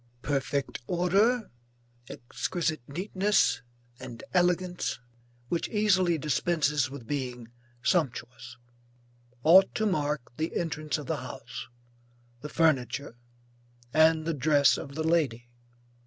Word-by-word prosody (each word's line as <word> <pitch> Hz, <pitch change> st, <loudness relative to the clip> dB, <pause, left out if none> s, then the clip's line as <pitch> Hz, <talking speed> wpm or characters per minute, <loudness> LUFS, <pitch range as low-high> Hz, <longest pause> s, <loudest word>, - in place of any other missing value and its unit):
Perfect 140 Hz, -1 st, -1 dB
order, 200 Hz, +7 st, +2 dB, 0.6 s
exquisite 155 Hz, +5 st, -3 dB
neatness 190 Hz, +6 st, +1 dB, 0.4 s
and 125 Hz, -3 st, -9 dB
elegance 180 Hz, 0 st, +1 dB, 0.5 s
which 170 Hz, +6 st, -2 dB
easily 185 Hz, -5 st, +2 dB
dispenses 150 Hz, -1 st, +1 dB
with 135 Hz, -3 st, -9 dB
being 125 Hz, -3 st, -4 dB, 0.3 s
sumptuous, 125 Hz, -6 st, -1 dB, 0.9 s
ought 185 Hz, +5 st, +6 dB
to 220 Hz, -, 0 dB
mark 150 Hz, -, -1 dB
the 160 Hz, +1 st, -2 dB
entrance 155 Hz, -3 st, -2 dB
of 150 Hz, -, -7 dB
the -, -, -2 dB
house, -, -, -8 dB, 0.7 s
the 150 Hz, -, -6 dB
furniture 140 Hz, -5 st, +1 dB, 0.8 s
and 160 Hz, 0 st, +4 dB
the 165 Hz, -, 0 dB
dress 145 Hz, 0 st, +4 dB
of 140 Hz, 0 st, -7 dB
the 160 Hz, -, -2 dB
lady. 130 Hz, -8 st, 0 dB
155 Hz, 105 wpm, -28 LUFS, 135-175 Hz, 0.9 s, ought